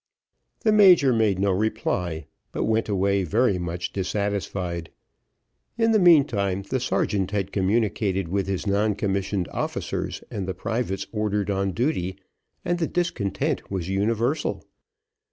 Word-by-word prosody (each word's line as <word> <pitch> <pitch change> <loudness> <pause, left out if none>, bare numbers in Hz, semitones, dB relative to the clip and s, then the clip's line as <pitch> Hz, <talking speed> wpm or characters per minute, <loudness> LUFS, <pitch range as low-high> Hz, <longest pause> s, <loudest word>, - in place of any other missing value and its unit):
The 220 - +3
major 180 -11 +6
made 110 -4 +2
no 100 +1 +2
reply, 90 -6 -1 0.3
but - - -2
went 110 0 0
away 100 0 +1
very 100 +1 +2
much 85 0 -4
dissatisfied. 95 -3 -2 0.9
In 225 -1 +3
the 215 - +4
meantime, 120 - +4
the 130 +6 -2
sergeant 100 -6 0
had 100 -2 -2
communicated 100 -2 0
with 95 +2 -1
his 95 0 -2
non 105 +1 +1
commissioned 95 -2 -1
officers - - -3
and 95 -2 -4
the 95 - -3
privates 105 -1 -2
ordered 105 -2 -1
on 100 0 0
the 95 - -2
duty, 105 - -1 0.5
and 175 0 0
the 165 - 0
discontent 145 - -2
was 95 -3 -3
universal. 115 +8 0
100 Hz, 135 wpm, -24 LUFS, 95-115 Hz, 0.9 s, major